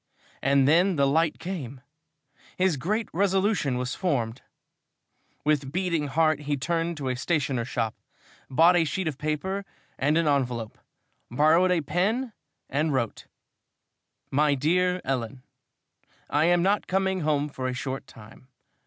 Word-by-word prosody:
And 135 Hz, 0 st, +3 dB
then 175 Hz, +5 st, +4 dB
the 140 Hz, -2 st, +3 dB
light 155 Hz, +3 st, +2 dB
came! 140 Hz, -9 st, -6 dB, 0.8 s
His 185 Hz, -3 st, +2 dB
great 210 Hz, -, -1 dB
resolution 190 Hz, -, +1 dB
was 125 Hz, +1 st, -2 dB
formed. 125 Hz, -9 st, -1 dB, 1.0 s
With 145 Hz, -3 st, +1 dB
beating 170 Hz, -3 st, -1 dB
heart 155 Hz, +1 st, +2 dB
he 145 Hz, -1 st, -2 dB
turned 165 Hz, +3 st, -1 dB
to 140 Hz, -3 st, -4 dB
a 125 Hz, -, -1 dB
stationer's 135 Hz, -4 st, -1 dB
shop, 115 Hz, -4 st, -2 dB, 0.6 s
bought 165 Hz, +6 st, +5 dB
a 175 Hz, -, +4 dB
sheet 170 Hz, +3 st, -2 dB
of 150 Hz, -3 st, -4 dB
paper 170 Hz, +6 st, -2 dB, 0.4 s
and 150 Hz, +4 st, +2 dB
an 165 Hz, -2 st, +2 dB
envelope, 125 Hz, -6 st, -1 dB, 0.5 s
borrowed 155 Hz, +8 st, +4 dB
a 180 Hz, -2 st, +2 dB
pen 215 Hz, -, -1 dB, 0.3 s
and 150 Hz, +3 st, 0 dB
wrote: 120 Hz, -5 st, -2 dB, 1.0 s
My 145 Hz, +1 st, +3 dB
DEAR 180 Hz, +6 st, +1 dB
ELLEN, 125 Hz, -1 st, -3 dB, 0.9 s
I 150 Hz, +2 st, +3 dB
am 175 Hz, 0 st, +3 dB
not 200 Hz, +2 st, +1 dB
coming 190 Hz, 0 st, 0 dB
home 150 Hz, -2 st, 0 dB
for 130 Hz, -3 st, -4 dB
a 130 Hz, -, -2 dB
short 130 Hz, +1 st, -5 dB
time. 110 Hz, +3 st, -15 dB
150 Hz, 140 wpm, -26 LUFS, 135-180 Hz, 1.0 s, bought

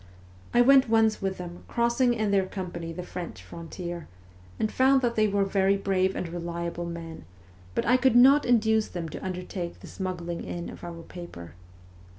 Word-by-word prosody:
I 240 Hz, -, +5 dB
went 265 Hz, 0 st, +6 dB
once 220 Hz, -1 st, +3 dB
with 195 Hz, -1 st, -2 dB
them, 175 Hz, -1 st, -8 dB
crossing 235 Hz, +1 st, +2 dB
in 215 Hz, -2 st, 0 dB
their 195 Hz, -2 st, +2 dB
company 175 Hz, -4 st, -5 dB
the 180 Hz, +2 st, -6 dB
French 180 Hz, -1 st, -7 dB
frontier, 170 Hz, 0 st, -7 dB, 0.5 s
and 215 Hz, -, 0 dB
found 265 Hz, 0 st, +4 dB
that 235 Hz, -1 st, +2 dB
they 215 Hz, -1 st, +3 dB
were 200 Hz, -1 st, +1 dB
very 195 Hz, 0 st, +2 dB
brave 190 Hz, -1 st, +1 dB
and 180 Hz, -, -3 dB
reliable 170 Hz, 0 st, -4 dB
men, 165 Hz, -, -7 dB, 0.5 s
but -, -, 0 dB
I 250 Hz, +3 st, +5 dB
could 255 Hz, -1 st, +3 dB
not 270 Hz, +4 st, +7 dB
induce 220 Hz, -2 st, +3 dB
them 170 Hz, -2 st, -5 dB
to -, -, -8 dB
undertake 180 Hz, -1 st, -5 dB
the -, -, -12 dB
smuggling 175 Hz, -3 st, -4 dB
in 175 Hz, 0 st, -5 dB
of -, -, -12 dB
our 170 Hz, -1 st, -7 dB
paper. 165 Hz, -, -10 dB
190 Hz, 175 wpm, -27 LUFS, 170-220 Hz, 0.5 s, not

